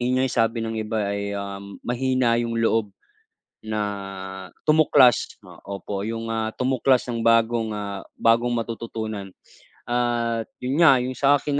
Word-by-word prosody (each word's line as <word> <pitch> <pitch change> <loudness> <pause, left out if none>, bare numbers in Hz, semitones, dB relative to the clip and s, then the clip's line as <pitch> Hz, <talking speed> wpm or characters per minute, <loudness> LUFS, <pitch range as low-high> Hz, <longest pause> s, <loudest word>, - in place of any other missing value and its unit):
'yon 125 +1 +1
nga'y 130 -2 +1
sabi 115 0 +1
ng 110 -1 -3
iba 105 -2 -2
ay, 100 0 -3
um, 100 0 -6
mahina 125 -1 +1
'yong 115 -1 -2
loob 115 -2 +1 0.7
na 110 0 -4 0.9
tumuklas, 150 -5 +4
o - - -13 0.2
opo, 100 +1 -5
'yong, 115 +2 -4
ah, 110 0 -1
tumuklas 130 0 +2
ng 115 -2 -3
bagong, 115 0 +3
ah, 100 -1 -5 0.2
bagong 115 +1 +3
matututunan. 110 -3 -5 0.5
At 120 -2 0 0.2
'yon 135 +5 -1
nga 160 -6 +8
'yong 130 - -3
sa 140 +3 +3
'kin 145 0 -1
115 Hz, 145 wpm, -24 LUFS, 110-125 Hz, 0.9 s, nga